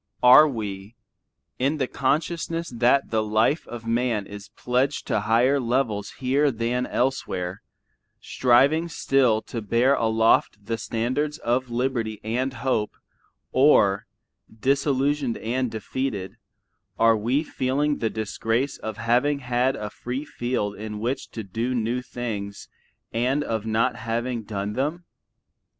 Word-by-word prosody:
Are 130 +5 +9
we, 105 -4 -5 0.6
in 140 +5 +1
the 135 - +1
consciousness 165 +5 -1
that 125 +3 +2
the 110 -1 +2
life 110 +8 +1
of 120 -1 -8
man 115 -2 0
is 100 -1 -10
pledged 130 +3 0
to - - 0
higher 120 +6 +3
levels 120 -4 -1
here 135 +3 +1
than 125 +1 -1
elsewhere, 95 -8 -2 0.6
striving 140 +7 +3
still 125 -8 +2
to 115 - -5
bear 115 +6 +3
aloft 110 -3 +2
the 115 +1 -2
standards 130 +7 -1
of 125 +2 -1
liberty 120 -3 -1
and 125 +5 -1
hope, 130 -5 -1 0.6
or, 105 -8 +4 0.4
disillusioned 135 +2 0
and 125 +2 -1
defeated, 110 -2 -4 0.6
are 115 0 +5
we 120 +8 0
feeling 145 +1 -1
the 110 - 0
disgrace 115 +4 -2
of 110 -1 -5
having 125 +6 +2
had 125 0 0
a 105 -1 -5
free 125 +6 -5
field 120 -7 -2
in 105 0 -6
which 120 +5 -3
to 110 - -6
do 115 +6 -2
new 120 +2 -1
things 105 -5 -5 0.5
and 130 +5 +1
of 110 -4 -3
not 110 +1 +1
having 115 +2 -2
done 105 -1 -4
them? 150 +8 -2
120 Hz, 130 wpm, -24 LUFS, 110-135 Hz, 0.6 s, Are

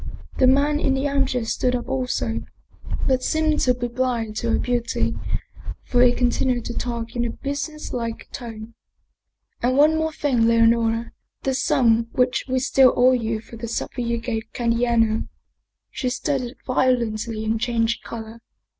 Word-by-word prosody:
The 260 - +6
man 285 +3 +3
in 270 -3 +1
the 270 +2 0
armchair 270 -4 0
stood 250 +2 0
up 240 0 -4
also, 250 - -1 0.6
but 260 -1 +2
seemed 310 +2 +1
to 250 -1 +3
be 245 0 -3
blind 235 -3 -2
to 235 - -1
her - - +3
beauty, 235 - -1 0.7
for 245 - +1
he 250 -1 +7
continued 245 0 0
to 235 - -4
talk 235 -1 -4
in 240 - 0
a 240 - -1
busi 285 +5 -4
nesslike 230 -6 -5
tone: 230 -2 -8 0.4
" - - -49
And 255 +2 +1
one 315 +2 +4
thing 280 -5 0
more, 225 - +4
Leonora, 230 0 +3 0.3
the 270 - 0
sum 230 -3 +2
which 250 0 +1
we 260 - +1
still 260 0 +4
owe 250 +1 +6
you 225 -3 -1
for 230 - -12
the 235 +1 -5
supper 235 +2 -3
you 235 0 -1
gave 230 -1 -4
Candiano 230 -2 +1 0.3
" - - -57
She 255 - -2
started 260 -1 -2
violently 235 -4 0
and 220 0 0
changed 235 -1 0
color. 225 0 -8
240 Hz, 165 wpm, -23 LUFS, 230-260 Hz, 0.7 s, he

